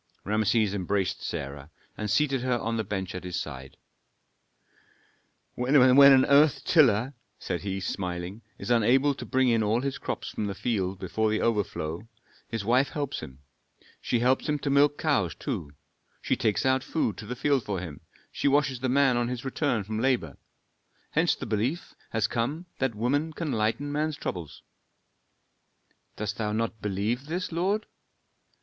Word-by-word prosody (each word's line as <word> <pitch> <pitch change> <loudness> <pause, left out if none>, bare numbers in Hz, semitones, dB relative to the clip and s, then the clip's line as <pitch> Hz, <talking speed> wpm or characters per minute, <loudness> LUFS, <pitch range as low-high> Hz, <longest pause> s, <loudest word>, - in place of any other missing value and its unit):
Rameses 110 0 +1
embraced 95 -1 -1
Sarah, 70 +1 -5 0.3
and 105 - -4
seated 135 +2 +2
her 125 -1 +1
on 115 0 -2
the 110 - -1
bench 95 -2 -4
at 90 - -6
his 90 -1 -3
side. 65 -5 -8 1.8
"When 125 +4 0
an 135 0 +8
earth 145 +1 +4
tiller," 130 - +4 0.2
said 90 - -4
he, 95 -1 -3
smiling, 90 +1 -4 0.2
"is - - -4
unable 130 +5 +4
to - - -8
bring 130 -1 +2
in 115 -1 +3
all 110 +3 +1
his 140 0 -3
crops - - -4
from 105 - -3
the 100 - -4
field 100 -4 -1
before 110 +4 -1
the 110 - 0
overflow, 100 -4 -1 0.4
his 115 -3 -4
wife 125 +5 +3
helps 145 -2 -3
him. 65 +2 -11 0.6
She 120 - 0
helps 130 +4 +2
him 150 - +1
to 140 - -1
milk 145 +1 +4
cows 135 - +1
too, 100 - -4 0.5
she - - 0
takes 110 +2 0
out 130 0 +2
food 135 -10 -1
to 110 - -8
the 125 - -4
field 140 0 +1
for 100 -3 -3
him, 80 -5 -8 0.3
she - - -1
washes 140 -2 +2
the 130 +1 -1
man 135 -1 +3
on 120 0 +1
his 125 +1 -5
return 135 -4 0
from 110 +2 -4
labor. 120 - 0 0.8
Hence - - +2
the - - -7
belief 115 - -2 0.2
has 110 -2 0
come 130 +10 -2
that 130 -4 0
woman 145 +8 0
can 155 -2 -3
lighten 115 +5 0
man's 150 +1 -1
troubles." 85 -5 -6 1.5
"Dost 105 +2 -4
thou 105 -2 -1
not 110 0 -2
believe 105 +7 -2
this, 180 +4 -3
lord?" 195 +6 0
115 Hz, 165 wpm, -27 LUFS, 100-135 Hz, 1.8 s, an